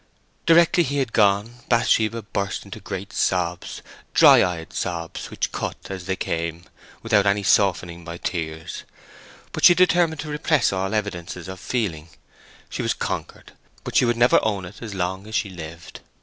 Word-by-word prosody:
Directly 170 +1 +6
he 140 -1 -2
had 130 -5 -1
gone, 105 +3 +2
Bathsheba 115 -1 +2
burst 100 -1 -3
into - - -9
great - - -6
sobs—dry 90 -1 +2
eyed 85 -3 -3
sobs, 85 -1 -4
which - - -2
cut - - -3 0.2
as 95 -2 -6
they 95 - 0
came, 85 -1 -3 0.4
without 105 -3 +3
any 100 +1 +2
softening 90 -3 +2
by 85 0 -7
tears. 80 -3 -4 0.7
But - - -5
she 175 - +9
determined 175 -4 +3
to 155 - -7
repress 150 -5 +1
all 95 +2 -1
evidences 90 -4 -4
of 95 0 -7
feeling. 90 -10 -3 0.6
She - - -4
was - - 0
conquered; - - -5 0.3
but - - -6
she - - +5
would 120 -1 +1
never 120 +1 +5
own 100 -4 -1
it 90 +4 -12
as 110 -4 -6
long 95 +2 -3
as 110 - -6
she 100 - 0
lived. 85 -1 -9
100 Hz, 165 wpm, -23 LUFS, 85-115 Hz, 0.7 s, she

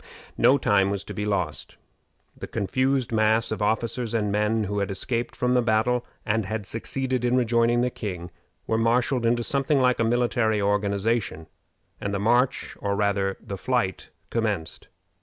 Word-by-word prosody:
No 125 +4 +5
time 100 -6 +2
was 100 -2 -2
to - - -8
be 105 - -3
lost. 90 -7 -2 0.6
The - - -7
confused 130 +5 0
mass 110 +1 +2
of 110 - -3
officers 115 +2 -1
and 105 -2 0
men 105 +2 +1
who 105 0 -2
had 100 - -1
escaped 115 +5 -2
from 125 0 +1
the 125 - +4
battle, 120 +2 +1 0.2
and 110 0 +1
had 105 +1 -4
succeeded 130 +4 -2
in 125 0 +2
rejoining 120 0 +2
the 125 0 0
king, 90 -7 -6 0.3
were 110 - 0
marshaled 120 +1 +2
into 120 0 +1
something 140 +1 +1
like 125 -2 +3
a - - +3
military 115 -2 +1
organization, 100 -2 0 0.5
and 100 0 -3
the - - -1
march, 120 +5 +1
or 100 -1 -1
rather 100 -1 0
the 100 -4 -7
flight, 120 -8 -1 0.2
commenced. 105 -8 -2
110 Hz, 165 wpm, -25 LUFS, 100-120 Hz, 0.6 s, No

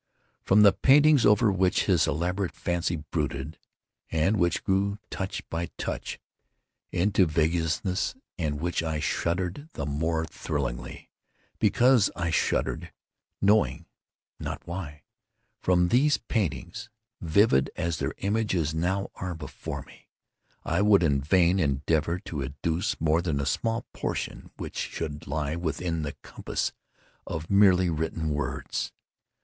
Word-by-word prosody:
From 105 +2 +5
the 100 - +7
paintings 145 0 +5
over 105 +1 +5
which 95 -1 +2
his - - +3
elaborate 90 +5 -1
fancy 85 0 -1
brooded, 75 -1 -4 0.5
and 80 +6 +2
which 85 -2 +1
grew, 100 +1 +1
touch 95 0 -4
by 85 +1 -3
touch, - - -4 0.7
into 95 0 +3
vaguenesses 85 - 0 0.2
at 75 -3 -1
which 85 +4 -1
I 80 -2 -2
shuddered 90 - -2
the 70 - -4
more 80 +3 -1
thrillingly, 70 -6 -4 0.5
because 125 -4 +4
I 85 -1 -1
shuddered - - 0 0.5
knowing 105 +2 +3 0.5
not - - -5
why—from 85 +1 -3
these 145 +7 +4
paintings 105 - -3 0.3
(vivid 80 -4 +3
as 85 -2 -2
their - - -2
images 100 -7 0
now 95 +5 -1
are 90 -2 -5
before 80 -1 -6
me) - - -18 0.6
I 85 +4 +1
would 100 -3 +5
in 70 -4 +2
vain 90 +4 +3
endeavor 75 +2 +1
to 75 -4 -5
educe 80 +8 -2
more 80 +1 +2
than 80 -5 -1
a 70 - -1
small 115 - -1
portion - - -4
which - - -7
should 75 -1 -4
lie 75 +2 -2
within 85 0 -2
the 75 -2 -4
compass - - -3 0.6
of 80 +3 -5
merely 95 -3 +5
written 80 0 -2
words. 75 0 -3
85 Hz, 125 wpm, -27 LUFS, 75-95 Hz, 0.7 s, the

